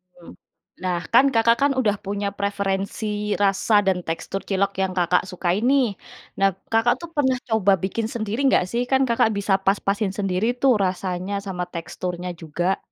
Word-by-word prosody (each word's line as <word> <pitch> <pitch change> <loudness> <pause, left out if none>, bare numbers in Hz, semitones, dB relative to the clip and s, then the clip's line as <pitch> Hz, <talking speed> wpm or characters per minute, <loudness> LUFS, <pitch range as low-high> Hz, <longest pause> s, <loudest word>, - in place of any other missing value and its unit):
Mhm. 175 -1 -14 0.5
Nah, 180 -1 0 0.2
kan, 270 - +7
Kakak 230 +1 +4
kan 280 0 +4
udah 220 -6 +1
punya 200 0 -2
preferensi 200 +1 -2
rasa 205 +2 +3
dan 190 -2 +1
tekstur 165 +4 -4
cilok 195 0 0
yang 190 -1 0
Kakak 180 0 +2
sukai 180 0 -1
nih. 255 -7 +2 0.4
Nah, 195 -1 +3 0.2
Kakak 225 +2 +4
tuh 340 - -7
pernah 265 -2 +3 0.2
coba 200 -3 +3
bikin 215 +4 -1
sendiri 220 0 -3
nggak 225 -8 +4
sih? 240 +1 0
Kan 265 0 +4
Kakak 230 -1 +3
bisa 200 -1 0
pas-pasin 200 0 +1
sendiri 195 +1 -1
tuh 260 -5 +5
rasanya 185 +1 -3
sama 180 -3 -4
teksturnya 180 +1 -5
juga. 175 +4 -1
200 Hz, 165 wpm, -23 LUFS, 185-225 Hz, 0.5 s, kan